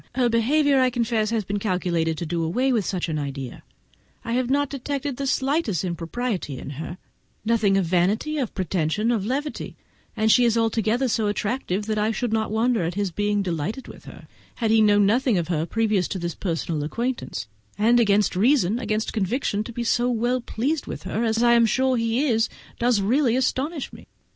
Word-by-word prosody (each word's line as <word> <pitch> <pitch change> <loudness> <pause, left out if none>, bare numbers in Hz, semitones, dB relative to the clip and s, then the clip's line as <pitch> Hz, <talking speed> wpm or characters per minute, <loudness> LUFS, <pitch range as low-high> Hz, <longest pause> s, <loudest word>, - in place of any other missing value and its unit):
Her 250 -2 +2
behaviour, 275 +5 +3
I 255 - +4
confess, 230 -3 0
has 225 -2 0
been 205 +2 -2
calculated 175 -5 0
to 170 - -3
do 165 +1 -2
away 250 +11 +1
with 220 -5 +1
such 180 -3 -2
an 155 -2 -2
idea; 135 -3 -5 0.6
I 230 - -2
have 250 0 0
not 285 +1 +2
detected 280 0 -3
the 275 - -2
smallest 265 - 0
impropriety 175 - -3
in 140 - -7
it—nothing 195 - -2
of 195 - +1
vanity, 195 - +1
of 250 -6 -3
pretension, 190 +4 0
of 215 -4 -1
levity; 285 +4 -3 0.4
and 220 0 +3
she 250 - +5
is 235 -1 +3
altogether 225 +2 +1
so 220 -2 0
attractive 205 -1 -2
that 215 0 -1
I 210 +1 +1
should 225 +1 -2
not 220 -1 0
wonder 225 +1 +1
at 170 +1 -2
his 200 -2 -1
being 205 +2 0
delighted 180 - -3
with - - -12
her, - - -12 0.3
had 225 -3 0
he 225 0 +5
known 205 -1 +5
nothing 235 +1 +2
of 170 -1 -2
her 160 -1 0
previous 215 -4 +1
to 195 - -4
this 170 -2 -3
personal 165 -3 -2
acquaintance; 230 - -3 0.3
but, 235 +3 +4
against 205 -4 +3
reason, 225 0 +3
against 215 -2 -2
conviction, 210 +1 -1
to - - -7
be 235 +1 -4
so 240 +1 +1
well 245 +1 0
pleased 275 +7 -2
with - - -6
her, 200 +4 -2
as 225 0 +1
I 235 0 +5
am 235 -1 +5
sure 260 +3 +2
he 230 +4 +1
is, 225 -4 +2 0.3
does 235 -3 +2
really 240 +4 +2
astonish 265 +3 -1
me. - - -13
220 Hz, 195 wpm, -24 LUFS, 190-245 Hz, 0.6 s, she